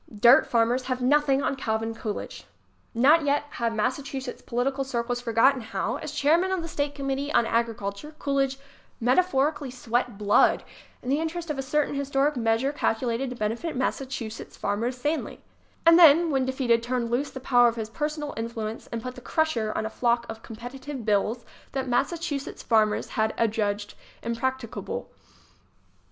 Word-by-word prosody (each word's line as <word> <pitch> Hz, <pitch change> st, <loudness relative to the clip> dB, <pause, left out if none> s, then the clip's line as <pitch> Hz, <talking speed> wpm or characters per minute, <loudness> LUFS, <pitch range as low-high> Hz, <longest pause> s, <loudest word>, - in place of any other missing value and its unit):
"Dirt" 240 Hz, +5 st, +7 dB
farmers 240 Hz, +2 st, +2 dB
have 255 Hz, -1 st, -2 dB
nothing 280 Hz, 0 st, +3 dB
on -, -, 0 dB
Calvin 225 Hz, -3 st, -2 dB
Coolidge! 220 Hz, -2 st, -6 dB, 0.5 s
Not 295 Hz, +7 st, +5 dB
yet 290 Hz, 0 st, +2 dB, 0.2 s
have 235 Hz, -1 st, +1 dB
Massachusetts 255 Hz, +3 st, -3 dB
political 265 Hz, +3 st, -1 dB
circles 245 Hz, -2 st, -2 dB
for 240 Hz, -1 st, -3 dB
gotten 255 Hz, +4 st, +4 dB
how, 220 Hz, +3 st, -2 dB
as 305 Hz, -, -6 dB
chairman 315 Hz, +5 st, +2 dB
of 375 Hz, -3 st, -1 dB
the -, -, -5 dB
state 290 Hz, -2 st, -2 dB
committee 275 Hz, +1 st, -2 dB
on 235 Hz, -5 st, +3 dB
agriculture, 230 Hz, +4 st, -2 dB
Coolidge 275 Hz, -2 st, 0 dB, 0.4 s
metaphorically 280 Hz, +2 st, +2 dB
sweat 245 Hz, -2 st, -2 dB
blood 205 Hz, +2 st, +4 dB, 0.4 s
in 250 Hz, -, -4 dB
the 280 Hz, +3 st, +2 dB
interest 330 Hz, 0 st, -3 dB
of 280 Hz, -, -4 dB
a -, -, +1 dB
certain 290 Hz, +2 st, 0 dB
historic 280 Hz, +1 st, +1 dB
measure 230 Hz, +3 st, +1 dB
cal 290 Hz, -, +1 dB
culated 245 Hz, +2 st, -2 dB
to 250 Hz, -, -6 dB
benefit 235 Hz, +9 st, -2 dB
Massachusetts 255 Hz, -3 st, -4 dB
farmers 230 Hz, +5 st, -1 dB
sanely 295 Hz, +5 st, -2 dB
ŌĆö -, -, -22 dB, 0.5 s
and 335 Hz, +1 st, +8 dB
then, 330 Hz, 0 st, +7 dB
when 265 Hz, -2 st, +1 dB
defeated, 250 Hz, -3 st, +2 dB
turned 240 Hz, -1 st, -2 dB
loose 275 Hz, +4 st, 0 dB
the 265 Hz, -, -8 dB
power 245 Hz, -2 st, +5 dB
of 235 Hz, -, 0 dB
his 220 Hz, -2 st, -4 dB
personal 300 Hz, +2 st, -3 dB
influence 225 Hz, -1 st, -5 dB
and 230 Hz, -1 st, -5 dB
put 255 Hz, -, -5 dB
the 250 Hz, -, -11 dB
crusher 245 Hz, -8 st, 0 dB
on 220 Hz, -, -1 dB
a -, -, -2 dB
flock 235 Hz, 0 st, +1 dB
of 225 Hz, 0 st, -7 dB
competitive 245 Hz, +3 st, -8 dB
bills 215 Hz, +3 st, +1 dB, 0.3 s
that 265 Hz, -1 st, -2 dB
Massachusetts 285 Hz, +3 st, -2 dB
farmers 215 Hz, -2 st, +2 dB
had 220 Hz, 0 st, 0 dB
adjudged 210 Hz, -2 st, 0 dB, 0.3 s
impracticable. 235 Hz, 0 st, -3 dB
255 Hz, 165 wpm, -26 LUFS, 230-280 Hz, 0.5 s, and